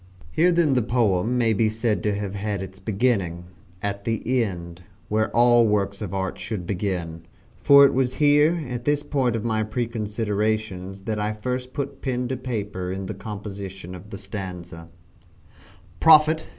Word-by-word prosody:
Here 175 - +3
then 170 -5 +3
the 125 - +3
poem 115 -1 +1
may 115 -2 +3
be 110 +1 +2
said 110 0 -1
to 105 -1 0
have 100 -1 -4
had 100 -1 -3
its 95 0 -10
beginning 95 -4 0 0.4
at 100 0 -3
the 115 +3 0
end 85 -4 -6 0.3
where 110 +1 +1
all 120 -1 +5
works 100 -1 0
of 100 -4 -4
art 95 -1 -3
should 100 -6 -4
begin 85 -4 -3 0.3
for 140 0 +8
it - - +3
was 130 -1 0
here 150 +2 +3
at 120 -1 -5
this 145 0 +1
point 130 -6 0
of 115 0 -3
my 110 -1 +1
preconsiderations 110 -3 -2
that 110 -2 -2
I 105 +1 -1
first 125 +4 -4
put 140 0 -5
pen 125 -2 -1
to 130 - -2
paper 105 -7 -4
in 95 +1 -4
the 105 - -4
composition 100 -3 -7
of 90 +3 -11
the 100 - -7
stanza: 90 -4 -7 1.1
"Prophet!" 160 0 +6
105 Hz, 165 wpm, -24 LUFS, 95-125 Hz, 1.1 s, for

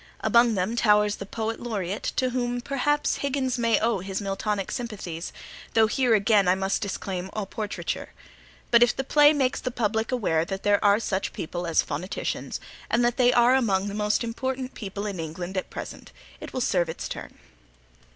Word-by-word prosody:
Among 235 -1 +4
them 190 +5 -1
towers 210 -2 +3
the 195 - -7
Poet 225 +2 -3
Laureate, 205 -4 -3
to 255 -1 +1
whom 245 -1 -1
perhaps 280 +3 0
Higgins 265 -2 -1
may 230 -1 +3
owe 225 -2 +1
his 190 +1 -4
Miltonic 200 0 -2
sympathies, 195 -8 -5 0.4
though 225 -1 +6
here 240 +1 +2
again 205 -2 +3
I 180 - +5
must 190 +1 -1
disclaim 190 -2 -4
all 210 -2 -2
portraiture. 210 +1 -4 0.6
But 235 - +6
if 240 -2 +5
the 270 - -2
play 295 +2 +6
makes 270 -4 0
the 255 - -2
public 220 -1 -1
aware 190 -10 +1
that 195 +3 -5
there 205 0 +3
are 205 +1 +5
such 195 -4 -2
people 175 +2 -4
as 165 - +3
phoneticians, 170 +7 -4 0.3
and 240 +1 +3
that 240 +1 +1
they 250 -1 +5
are 240 0 +5
among 205 -6 +2
the - - -6
most 210 +2 +1
important 260 +2 -3
people 200 -1 -5
in 200 -4 -4
England 175 +4 -5
at 185 - -2
present, - - -8 0.3
it - - -8
will 255 - -3
serve 175 -7 +1
its 160 - -5
turn. - - -8
215 Hz, 185 wpm, -26 LUFS, 195-245 Hz, 0.6 s, though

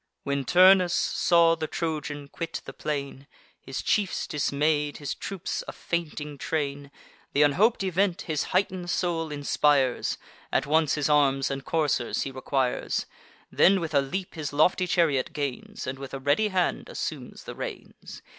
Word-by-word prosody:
When 140 -1 -1
Turnus 185 +2 +6
saw 170 -1 +3
the 160 -1 -3
Trojan 150 -3 -4
quit 165 +3 -5
the - - -8
plain, 140 -2 -4 0.3
His 135 - -6
chiefs 200 -3 0
dismay'd, 150 0 0
his 145 -2 -4
troops 195 -3 -4
a - - -4
fainting 150 -4 -4
train, 145 -2 -3 0.5
Th' 145 - +6
unhop'd 195 +10 +3
event 190 0 +1
his 155 -3 -1
heighten'd 185 -1 -1
soul 165 -3 -1
inspires: 145 -2 +1 0.3
At - - +1
once 155 0 +2
his 150 -2 0
arms 140 -3 +3
and 135 0 -4
coursers 150 -7 0
he 135 - -5
requires; 130 -1 -1 0.5
Then, 195 +1 +5
with 165 -3 -4
a 140 - +5
leap, 180 +8 -4
his 155 -3 -4
lofty 180 +5 +3
chariot 160 -7 +1
gains, 140 -4 -4
And 130 +1 -5
with 135 0 -7
a - - -5
ready 145 +11 +2
hand 185 -3 -1
assumes - - -5
the - - -7
reins. - - -8
150 Hz, 155 wpm, -26 LUFS, 140-175 Hz, 0.5 s, Turnus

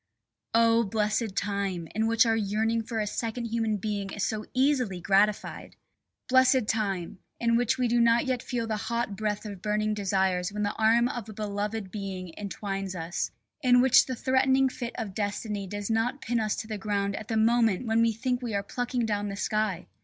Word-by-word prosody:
Oh! 230 0 +5
blessed 215 0 -1
time, 195 -4 -2
in 220 +1 +1
which 230 +1 +4
our 225 -1 +2
yearning 220 +2 0
for 225 0 -4
a 210 - 0
second 230 +3 -3
human 225 -2 0
being 200 -1 -3
is 200 0 -4
so 215 -1 -3
easily 255 -8 +2
gratified! 200 +3 +1 0.5
Blessed 260 -2 +4
time, 195 -5 -2 0.2
in 235 0 +2
which 240 0 +2
we 250 -1 +1
do 240 0 +3
not 235 +1 +4
yet 255 -2 -1
feel 240 -3 -3
the 220 -1 -2
hot 235 0 -2
breath 210 +1 -2
of 200 -3 -7
burning 215 0 0
desires 190 -2 0
when 210 +1 -2
the 205 +1 0
arm 230 +2 +3
of 240 -3 -5
a - - -7
beloved 205 -1 -3
being 190 -4 -5
entwines 195 -2 -4
us, 165 0 -3 0.3
in 250 -3 +5
which 255 0 +6
the 260 - -3
threatening 265 +1 +3
fist 245 -2 -5
of 220 -5 -4
Destiny 205 0 -3
does 205 +2 -4
not 230 +5 0
pin 240 -2 -1
us 215 -1 0
to 220 - -6
the 215 -2 -4
ground 200 -1 -1
at 215 - -7
the 225 - -1
moment 225 -1 +3
when 225 0 +2
we 230 0 +4
think 250 +3 -2
we 235 -4 -3
are 200 - 0
plucking 245 +2 -2
down 205 -1 -1
the 200 - -4
sky! 215 -3 -1
215 Hz, 200 wpm, -28 LUFS, 200-235 Hz, 0.5 s, which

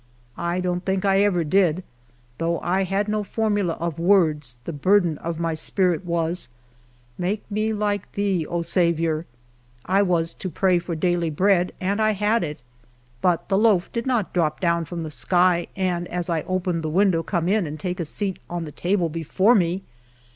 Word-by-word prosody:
I 170 +1 -1
don't 180 0 -1
think 190 +1 -1
I 195 0 +4
ever 190 -4 +2
did; 180 +1 +2 0.6
though 170 0 0
I 190 +2 +1
had 195 +3 -1
no 210 0 0
formula 205 -4 0
of 170 -2 -4
words, 155 -9 +2
the 170 - -5
burden 175 +1 +2
of 165 -1 -4
my 165 -1 0
spirit 180 +2 +1
was, 170 -2 -2 0.3
" - - -33 0.3
Make 195 +4 -1
me 215 +2 0
like 205 -2 -1
to - - -26
thee, 195 -5 0
O 170 0 -2
Saviour." 165 -2 +1 0.6
1 195 +1 +2
was 165 -2 0
to 185 - -5
pray 180 +1 +2
for 170 0 -4
daily 175 0 0
bread, 180 +3 +2
and 200 +3 0
I 215 0 +3
had 210 +3 +1
it; 150 -4 -6 0.6
but 175 -2 +1
the 195 0 +2
loaf 210 -5 +3
did 235 +1 -2
not 240 -5 0
drop 155 -4 0
down 170 -2 +1
from 170 +1 -5
the 155 - -5
sky, 175 +1 +2
and 180 -2 -1
as 175 0 -2
I 165 -2 +1
opened 180 -2 -1
the 155 - -3
window 180 0 +3
come 170 0 -1
in 200 -2 +2
and 150 +1 -6
take 180 +2 -3
its 165 -3 -3
seat 195 -3 -3
on 175 -1 -3
the 150 - -8
table 180 +3 0
before 165 +7 +2
me. 185 -2 +1
180 Hz, 190 wpm, -23 LUFS, 165-195 Hz, 0.6 s, I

